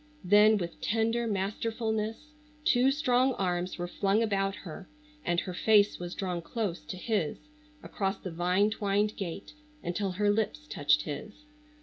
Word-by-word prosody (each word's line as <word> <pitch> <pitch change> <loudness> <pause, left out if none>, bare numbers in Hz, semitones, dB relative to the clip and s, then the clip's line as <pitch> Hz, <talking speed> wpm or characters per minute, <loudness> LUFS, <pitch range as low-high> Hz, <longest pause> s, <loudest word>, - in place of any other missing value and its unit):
Then 210 +3 +6
with 175 -3 -5
tender 230 +2 +1
masterfulness 220 +5 -2 0.3
two 260 -6 +4
strong 260 -2 +2
arms 180 -1 -1
were 175 0 -3
flung 200 +4 +1
about 195 -2 0
her 185 +1 -9 0.3
and 175 0 +1
her 185 - -5
face 210 +2 +4
was 175 0 -5
drawn 180 -3 -2
close 195 0 -3
to 160 +4 -6
his 195 -6 -1 0.5
across 195 -1 -2
the 185 - -7
vine 180 +5 +2
twined 210 0 0
gate 195 - -6 0.3
until 185 +2 -2
her 205 +2 +2
lips 220 +8 -1
touched 145 - +2
his. 210 - -7
200 Hz, 145 wpm, -30 LUFS, 180-220 Hz, 0.5 s, Then